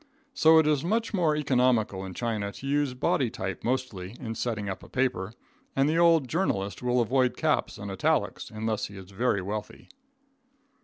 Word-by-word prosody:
So 160 -10 +6
it 160 - +5
is 150 -3 +2
much 225 +6 0
more 165 -6 +2
economical 125 -8 +1
in 95 -2 -7
China 110 -4 -2
to - - -10
use 140 -2 0
body 125 0 +1
type 95 -5 -5
mostly 120 -6 -3
in 115 -4 -4
setting 110 -3 -3
up 95 - -4
a - - -13
paper, 125 -7 -1 0.4
and 135 +1 +3
the 160 +2 +2
old 165 -5 +5
journalist 105 - -1
will 125 0 +2
avoid 125 +2 +1
caps - - 0
and 100 0 -6
italics, 95 - 0
unless 110 0 -2
he 100 - -12
is 95 0 -11
very 100 -1 0
wealthy. 105 +2 -6
125 Hz, 175 wpm, -27 LUFS, 100-140 Hz, 0.4 s, So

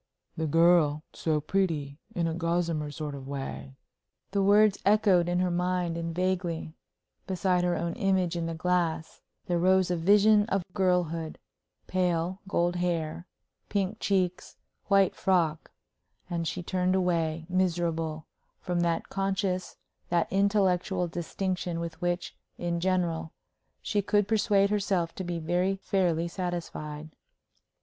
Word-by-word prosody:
"The 160 0 -2
girl 165 -1 +4
so 155 -2 0
pretty, 155 -4 -1 0.2
in 170 - 0
a 165 - -1
gossamer 165 -2 -1
sort 150 0 -5
of 135 -1 -8
way," 70 - -6 0.6
The 200 0 +1
words 205 +1 +5
echoed 195 -4 +4
in 175 - +1
her 180 0 +1
mind, 180 -1 0
and 165 -1 -4
vaguely, 180 -3 -1 0.5
beside 180 -1 +1
her 175 0 +1
own 170 0 -2
image 185 -3 +1
in 170 -1 -2
the 165 - -3
glass, 170 -1 -1 0.2
there 175 -1 0
rose 185 0 +3
a - - +2
vision 205 +4 +5
of 195 -4 0
girlhood 175 -4 0 0.5
pale, 180 0 0
gold 175 -2 +1
hair, 170 -1 -2 0.4
pink 200 +1 -1
cheeks, 185 -3 -1 0.3
white 195 -2 +4
frock 165 -5 +1 0.6
and 170 -1 -1
she 180 - -3
turned 185 +1 0
away, 165 -3 0
miserable, 170 -4 -1 0.3
from 175 -1 -2
that 170 -1 0
conscious, 195 -1 -2 0.3
that 170 -1 +2
intellectual 190 -2 +2
distinction 175 +1 -3
with 170 0 -6
which, 175 0 -2 0.2
in 170 -1 -2
general, 170 -3 -1 0.5
she 205 - 0
could 205 0 +1
persuade 205 -2 +3
herself 190 -5 0
to 190 - -5
be 175 -1 -3
very 175 +4 0
fairly 175 -4 0
satisfied. 165 -4 -5
175 Hz, 135 wpm, -28 LUFS, 165-190 Hz, 0.6 s, words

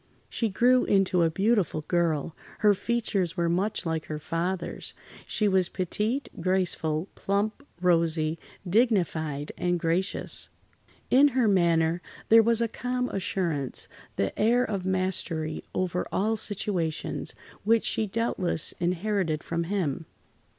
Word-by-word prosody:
She 230 - 0
grew 245 +5 +4
into 195 -2 +3
a 165 - +4
beautiful 195 -3 +1
girl. 165 -1 0 0.3
Her 210 -1 +6
features 200 -4 -1
were 170 -1 +1
much 190 +3 0
like 160 -1 -2
her 155 - -4
father's. 170 +3 -3 0.3
She 210 - +1
was 190 -2 +2
petite, 210 +8 -2
graceful, 175 -3 0
plump, 205 +6 -1 0.2
rosy, 165 -2 +2 0.3
dignified, 170 - +1
and 175 -1 +1
gracious. 170 +4 -1 0.6
In 275 +3 +7
her 245 -3 +4
manner, 170 -3 +3 0.3
there 225 +1 +8
was 230 +1 +3
a 230 - +2
calm 250 +2 -2
assurance—the 165 - -3
air 235 +4 +4
of 195 -5 -3
mastery 185 -4 -1
over 180 -1 -1
all 215 +3 +1
situations—which 205 +2 -1
she 220 - 0
doubtless 190 -6 0
inherited 180 -2 0
from 170 0 -2
him. 165 -5 -2
185 Hz, 120 wpm, -27 LUFS, 165-210 Hz, 0.6 s, there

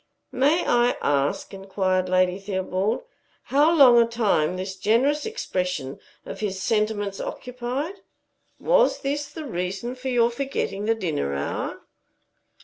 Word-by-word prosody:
"May 280 +7 +2
I 240 0 +3
ask," 140 +6 0
inquired 190 -1 -1
Lady 185 0 +2
Theobald, 195 - -2 0.5
"how 295 +4 +5
long 265 -7 +7
a 230 - +3
time 205 -8 +1
this 190 +1 -4
generous 265 - +1
expression 180 - -3 0.3
of - - -7
his 195 -3 -3
sentiments 210 -2 -1
occupied? 250 +9 -5 0.6
Was - - +3
this 290 +1 -2
the 300 +2 -8
reason 195 +1 -3
of 255 0 -11
your 240 -3 +2
forgetting 240 -6 -3
the 225 +1 +2
dinner 155 - -2
hour?" 70 +1 -3
220 Hz, 130 wpm, -24 LUFS, 185-265 Hz, 0.6 s, long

